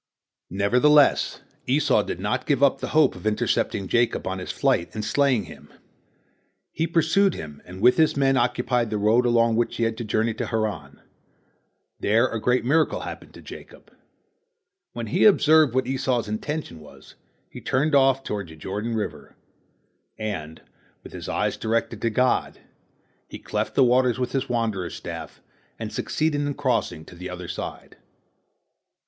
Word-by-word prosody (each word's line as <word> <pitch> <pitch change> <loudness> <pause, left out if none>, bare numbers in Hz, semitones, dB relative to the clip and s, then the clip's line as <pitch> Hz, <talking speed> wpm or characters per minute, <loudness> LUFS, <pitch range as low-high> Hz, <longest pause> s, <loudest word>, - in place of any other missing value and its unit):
Nevertheless 125 - +3 0.3
Esau 130 -4 +3
did 90 - -5
not 105 +2 -2
give 140 -2 +2
up 140 - +4
the - - -4
hope 155 -1 +3
of - - -6
intercepting 105 -2 0
Jacob 120 +4 +1
on 95 0 -3
his 90 - -5
flight 85 - +1
and 105 0 -3
slaying 135 0 +2
him. - - -14 1.0
He 165 +2 -1
pursued 170 +4 +2
him, 75 -2 -9
and 90 +1 -10
with 125 - +5
his 160 -2 +3
men 135 -1 +3
occupied 125 -1 0
the 105 - -2
road 110 +4 +3
along 115 -1 +3
which 120 - 0
he 115 - 0
had 115 -1 -1
to - - -3
journey 110 +1 0
to - - -4
Haran. 95 - -3 1.0
There 115 +5 +3
a 115 -3 -4
great 125 -1 +1
miracle 155 +4 +2
happened - - -9
to - - -13
Jacob. - - -13 1.0
When 120 -1 -5
he 105 - 0
observed 155 - +5
what 130 -1 +2
Esau's 130 -3 -1
intention 110 - -4
was, 75 - -15 0.3
he - - -11
turned 145 +4 0
off 135 -1 +4
toward 100 -6 -4
the 80 - -12
Jordan 105 +8 -4
river, 110 - -5 0.8
and, 80 -8 -5 0.4
with - - -8
eyes - - -1
directed 115 -1 -2
to 115 - +1
God, 125 +3 +1 0.7
he - - -9
cleft - - -3
the - - +5
waters 125 0 +3
with 125 -1 -2
his 135 -1 -2
wanderer's 110 -7 -2
staff, - - -8 0.4
and - - -6
succeeded 155 -2 -1
in 145 -1 -2
crossing 125 - -1
to - - -14
the 90 +1 -8
other 90 -1 -7
side. 90 - -7
120 Hz, 160 wpm, -24 LUFS, 105-135 Hz, 1.0 s, with